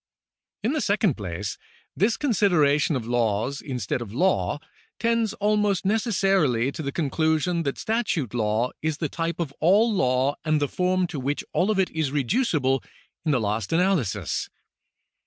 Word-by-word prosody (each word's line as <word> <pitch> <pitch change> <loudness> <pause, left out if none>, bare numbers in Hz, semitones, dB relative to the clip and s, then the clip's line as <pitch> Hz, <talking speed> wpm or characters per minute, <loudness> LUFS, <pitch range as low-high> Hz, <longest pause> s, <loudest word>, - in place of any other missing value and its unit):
In 235 +7 +1
the 310 - 0
second 200 - +2
place, 100 0 -5 0.4
this 215 +4 +2
consideration 165 - +2
of 125 -4 -3
laws 120 +2 0
instead 125 -4 -3
of 110 -4 -6
law 175 -2 +1 0.4
tends 230 -2 +1
almost 210 -2 +1
necessarily 195 - +2
to 160 - -6
the 140 -2 -3
conclusion 160 +3 0
that 140 -4 -2
statute 215 - -1
law 110 +1 0
is 155 -1 -1
the 155 -2 -2
type 170 0 -3
of 155 -5 -3
all 210 +7 +4
law 130 -5 +1
and 155 -1 +2
the 145 - +1
form 185 +3 +1
to 165 -5 -5
which 140 +3 -2
all 185 - +2
of 215 - +1
it 190 -1 +1
is 155 -4 -1
reducible 145 - +1 0.4
in 155 - +2
the 130 - +2
last 105 -1 -2
analysis. 160 - 0
155 Hz, 155 wpm, -25 LUFS, 130-195 Hz, 0.4 s, all